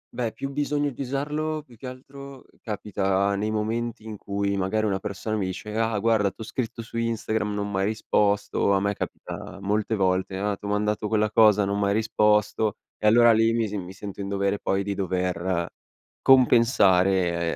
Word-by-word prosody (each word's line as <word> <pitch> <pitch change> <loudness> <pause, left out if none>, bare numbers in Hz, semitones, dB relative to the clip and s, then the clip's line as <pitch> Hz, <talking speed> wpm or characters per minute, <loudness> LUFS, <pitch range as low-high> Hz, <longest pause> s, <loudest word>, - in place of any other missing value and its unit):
Beh, 120 -3 -1
più 135 0 -6
bisogno 145 0 -1
di 130 - -8
usarlo 150 +3 -2
più 125 -5 -18
che 130 - -9
altro 135 +1 -10 0.2
capita 100 -2 -1
nei 105 +2 -1
momenti 110 +1 -2
in 110 -1 -6
cui 100 0 -2
magari 110 +3 0
una 95 -2 0
persona 105 +3 -4
mi 95 - -1
dice: 105 +3 -6
"Ah, 115 -1 0
guarda, 110 -2 +2
t'ho 110 - -10
scritto 115 0 -4
su 115 +1 -8
Instagram, 110 -2 -1
non 100 0 -3
m'hai 95 0 0
risposto" 105 -2 +1
a 95 - +3
me 100 +1 0
capita 100 0 -7
molte 105 +2 -1
volte: 95 0 0
"Ah 100 +1 -1
t'ho 100 - -9
mandato 105 +1 0
quella 110 0 +1
cosa, 105 -2 +5
non 100 +1 -1
m'hai 100 0 +1
risposto." 105 -1 +2 0.2
E 105 - +1
allora 120 +1 +6
lì 115 +1 +3
mi 115 -2 +1
mi 90 0 -8
sento 100 0 -8
in 100 - -4
dovere 100 0 -1
poi 95 0 0
di 100 0 -2
dover 90 -2 -1 0.6
compensare, 95 -9 +4
105 Hz, 180 wpm, -25 LUFS, 100-115 Hz, 0.6 s, allora